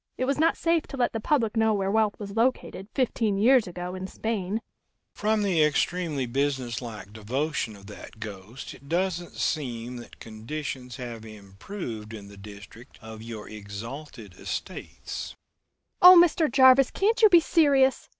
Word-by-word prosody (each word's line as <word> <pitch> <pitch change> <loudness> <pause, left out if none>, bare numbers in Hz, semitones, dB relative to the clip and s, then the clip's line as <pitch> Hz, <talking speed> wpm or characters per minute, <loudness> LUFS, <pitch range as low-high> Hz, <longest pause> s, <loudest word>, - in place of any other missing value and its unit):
It 255 - 0
was 275 +2 -1
not 325 +1 +3
safe 330 -1 +1
to 275 - -8
let 245 -2 +1
the 225 - -2
public 235 -3 0
know 220 -1 +3
where 195 -1 -1
wealth 215 -1 +1
was 200 -2 -7
located, 230 -5 -1
fifteen 225 -6 0
years 235 +1 +4
ago, 180 0 -6
in 185 0 -5
Spain." 215 -1 -3 0.5
"From 215 0 0
the 180 -5 +2
extremely 150 -1 0
businesslike 120 -6 -3
devotion 120 +2 -3
of 100 0 -15
that 105 +1 -12
ghost, 105 +3 -8
it 140 +2 -16
doesn't 175 0 -1
seem 125 -5 -3
that 120 - -12
conditions 125 +3 -6
have 120 -3 -7
improved 110 - -8
in 100 -2 -10
the 100 - -13
district 105 +5 -13
of 110 -2 -10
your 110 -2 -8
exalted 110 - -9
estates!" - - -6 0.7
"Oh, 360 0 +11
Mr. 335 -2 +3
Jarvis, 260 0 +6
can't 445 +4 0
you 435 - +8
be 350 -3 +7
serious? 280 -5 +2
155 Hz, 155 wpm, -26 LUFS, -, 0.7 s, Oh